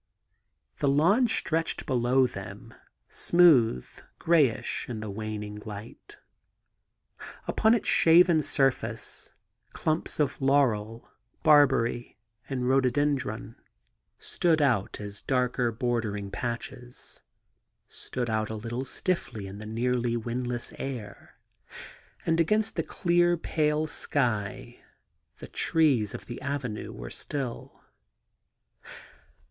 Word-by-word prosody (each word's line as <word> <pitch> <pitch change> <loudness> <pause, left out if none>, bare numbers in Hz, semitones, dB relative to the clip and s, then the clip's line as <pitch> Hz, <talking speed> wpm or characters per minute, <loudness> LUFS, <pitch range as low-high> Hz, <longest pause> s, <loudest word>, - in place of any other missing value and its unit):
The 145 - 0
lawn 175 - +4
stretched 165 -6 -1
below 130 +1 +3
them, 125 - -8 0.3
smooth, 135 - +4 0.3
greyish 150 -11 +1
in 115 -3 -4
the 110 -1 -5
waning 105 0 -5
light. 105 +1 -10 1.3
Upon 220 +1 +3
its 230 - -2
shaven 170 0 +6
surface 135 -2 -1 0.4
clumps 155 0 -2
of 145 -1 0
laurel, 120 -5 +1 0.4
barbary, 135 -5 +3 0.3
and 125 -2 -2
rhododendron 130 -3 0 0.6
stood 165 -3 +1
out 120 -9 +1
as 105 -1 -8
darker, 125 -2 0
bordering 110 -4 -2
patches 120 +2 -6 0.3
— - - -51
stood 125 -1 -5
out 110 -1 -1
a 110 - -4
little 120 +4 -4
stiffly 130 - -3
in 95 +1 -8
the 105 - -8
nearly 120 +1 0
Mrindless 120 +1 -4
air; 120 -7 -7 0.9
and 165 0 +1
against 215 +6 +1
the - - +1
clear 175 -1 +2
pale 155 -1 0
sky 120 -4 -2 0.5
the - - -9
trees 145 -10 +1
of - - -9
the 120 - -8
avenue 130 -6 -4
were - - -8
still. 135 -5 -6
125 Hz, 105 wpm, -28 LUFS, 115-150 Hz, 1.3 s, shaven